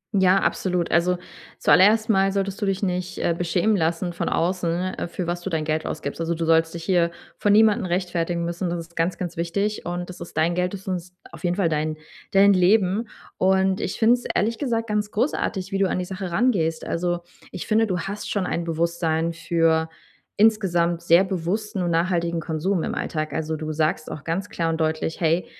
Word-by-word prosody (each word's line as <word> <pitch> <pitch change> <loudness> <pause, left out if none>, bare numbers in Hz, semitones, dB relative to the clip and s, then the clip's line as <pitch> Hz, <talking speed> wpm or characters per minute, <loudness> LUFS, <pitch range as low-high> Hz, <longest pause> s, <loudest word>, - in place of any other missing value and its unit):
Ja, 190 0 +5
absolut. 180 -2 0
Also, 175 +2 +3 0.4
zuallererst 215 +4 +5
mal 195 -1 +3
solltest 195 +1 -2
du 200 - 0
dich 195 +1 -1
nicht, 180 -1 -2
äh, 170 - +1
beschämen 175 +5 +1
lassen 170 0 0
von 170 - -2
außen, 180 +1 0
äh, - - -4
für 175 +1 -4
was 175 +1 -3
du 190 - -4
dein 160 -2 -1
Geld 155 0 -1
ausgibst. 145 +1 -4
Also 165 0 -1
du 165 - -2
sollst 165 0 +3
dich 165 - -6
hier 175 -2 +2 0.3
vor 205 - +1
niemanden 215 0 +5
rechtfertigen 175 -1 -1
müssen. 170 +1 -2
Das 170 0 -2
ist 170 0 -11
ganz, 165 +2 0
ganz 175 -2 -5
wichtig 200 +4 -2
und 175 +1 -4
das 180 - -13
ist 170 - -9
dein 165 +2 +2
Geld, 180 +2 -1
das 195 0 -11
ist 180 -1 -4 0.2
auf 170 0 -12
jeden 175 0 +1
Fall 195 -5 +1
dein 155 0 -1 0.3
dein 200 +1 +6
Leben. 195 +3 +3 0.3
Und 190 0 +2
ich - - -3
finde 230 +1 +5
es 245 0 -2
ehrlich 225 +3 +1
gesagt 230 -5 -1
ganz 210 0 -1
großartig, 210 -5 -1
wie 195 - -1
du 195 - +2
an - - -1
die 180 - -2
Sache 190 0 -5
rangehst. 170 -6 +1
Also, 175 0 -1 0.3
ich 180 - -6
finde, 220 0 +2
du 185 -2 -1
hast 200 +4 -5
schon 200 -3 -1
ein 170 -1 -2
Bewusstsein 165 0 0
für 165 -1 +1 0.5
insgesamt 175 -6 +2
sehr 170 +2 +5
bewussten 190 +3 -2
und 175 - 0
nachhaltigen 170 0 +1
Konsum 165 +3 -1
im - - -3
Alltag. 155 -1 -3
Also 160 0 -2
du 155 0 -4
sagst 155 0 -1
auch 150 - -7
ganz 185 +5 -2
klar 165 -1 -1
und 160 0 -2
deutlich: 160 +1 -1
„Hey, 165 +2 +2
175 Hz, 205 wpm, -23 LUFS, 165-195 Hz, 0.5 s, dein